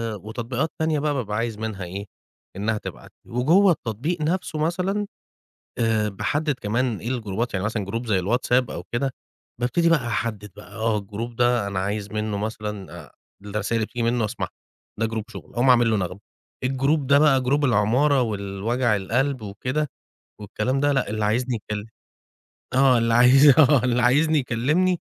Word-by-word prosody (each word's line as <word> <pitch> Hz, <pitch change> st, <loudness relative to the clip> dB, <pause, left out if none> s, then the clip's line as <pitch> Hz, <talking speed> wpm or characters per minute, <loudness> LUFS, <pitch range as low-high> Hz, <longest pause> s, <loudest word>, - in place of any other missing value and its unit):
وتطبيقات 120 Hz, -, -3 dB
تانية 160 Hz, -2 st, +1 dB
بقى 150 Hz, 0 st, 0 dB
بابقى 105 Hz, -6 st, -2 dB
عايز 115 Hz, -1 st, -2 dB
منها 110 Hz, -3 st, -4 dB
إيه، 95 Hz, +3 st, -6 dB, 0.5 s
إنّها 105 Hz, +3 st, -1 dB
تبعت -, -, -9 dB
لي، -, -, -17 dB
وجوّه 170 Hz, +11 st, +4 dB
التطبيق 150 Hz, -, -3 dB
نَفْسه 165 Hz, 0 st, -1 dB
مثلًا، 185 Hz, +6 st, -1 dB, 0.7 s
آآ 110 Hz, -2 st, +1 dB
باحدِّد 145 Hz, +9 st, -1 dB
كمان 115 Hz, +2 st, -1 dB
إيه، 115 Hz, -, -5 dB
الجروبات، 115 Hz, -2 st, -2 dB
يعني 95 Hz, +1 st, -1 dB
مثلًا 110 Hz, -2 st, -2 dB
جروب 115 Hz, +5 st, -4 dB
زي 100 Hz, -4 st, +2 dB
الواتساب 120 Hz, +5 st, +1 dB
أو 85 Hz, -, -6 dB
كده، 135 Hz, +3 st, 0 dB, 0.5 s
بابتدي 150 Hz, +8 st, +2 dB
بقى 150 Hz, -8 st, +2 dB
أحدِّد 105 Hz, -3 st, -3 dB
بقى، 105 Hz, +2 st, -13 dB
آه 110 Hz, -1 st, 0 dB
الجروب 105 Hz, +4 st, -6 dB
ده 120 Hz, -3 st, +2 dB
أنا 100 Hz, -1 st, -2 dB
عايز 100 Hz, +1 st, -3 dB
منّه 105 Hz, -1 st, -2 dB
مثلًا 105 Hz, -2 st, -5 dB
آآ -, -, -21 dB, 0.3 s
الرسايل 105 Hz, +2 st, -1 dB
بتيجي 120 Hz, +2 st, -3 dB
منّه 115 Hz, -1 st, +1 dB
أسمعها، 105 Hz, +2 st, -4 dB, 0.5 s
ده 115 Hz, -, +2 dB
جروب 110 Hz, -1 st, -3 dB
شُغل، 100 Hz, -4 st, -11 dB
أقوم 120 Hz, +2 st, +2 dB
عامل 120 Hz, -2 st, +5 dB
له 110 Hz, -, +2 dB
نغمة. 90 Hz, 0 st, -3 dB, 0.4 s
الجروب 135 Hz, +3 st, +1 dB
ده 140 Hz, +1 st, +5 dB
بقى 140 Hz, -3 st, +4 dB
جروب 140 Hz, +3 st, +1 dB
العمارة 125 Hz, +5 st, +3 dB
والوجع 105 Hz, +2 st, -1 dB
القلب 125 Hz, +7 st, -1 dB
وكده 125 Hz, +9 st, -2 dB, 0.5 s
والكلام 105 Hz, +6 st, -2 dB
ده 145 Hz, +1 st, +2 dB
،لأ، 135 Hz, -6 st, 0 dB
اللي 110 Hz, 0 st, -1 dB
عايزني 120 Hz, +4 st, 0 dB
يكل 105 Hz, 0 st, -5 dB, 0.9 s
آه، 130 Hz, -1 st, +5 dB
اللي 115 Hz, 0 st, +1 dB
عايز 125 Hz, +5 st, +7 dB
آه، 140 Hz, -4 st, +6 dB
اللي 125 Hz, -1 st, +1 dB
عايزني 150 Hz, +6 st, +4 dB
يكلِّمني، 150 Hz, +9 st, +1 dB
120 Hz, 165 wpm, -23 LUFS, 105-135 Hz, 0.9 s, عايز